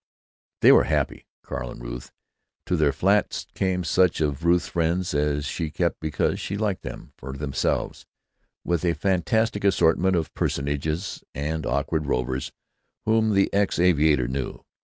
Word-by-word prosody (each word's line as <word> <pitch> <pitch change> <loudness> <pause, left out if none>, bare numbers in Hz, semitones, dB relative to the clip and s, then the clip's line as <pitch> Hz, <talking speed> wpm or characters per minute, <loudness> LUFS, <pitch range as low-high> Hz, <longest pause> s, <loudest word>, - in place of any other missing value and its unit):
They - - +8
were - - +6
happy, - - -1 0.2
Carl 60 - -5
and - - -9
Ruth. - - -7 0.5
To 90 - 0
their 75 -4 +3
flat 95 +8 +1
came 95 -1 0
such 90 0 +2
of 75 -1 -1
Ruth's 85 +1 +3
friends 85 +1 0
as 75 -1 0
she 80 +2 -3
kept - - -1
because 80 -1 -1
she 100 - -3
liked 100 -3 -1
them - - -8
for 65 +1 -7
themselves, 70 0 -2 0.6
with 85 -1 0
a 85 -2 +2
fantastic 100 +3 +1
assortment 95 -1 +3
of 80 -2 -2
personages 75 +6 -2
and 75 +3 -2
awkward 70 +3 -1
rovers 65 0 -1 0.5
whom 110 -1 +3
the 100 - +2
ex 100 0 +1
aviator 75 -7 +3
knew. 65 +1 -4
80 Hz, 150 wpm, -25 LUFS, 70-95 Hz, 0.6 s, They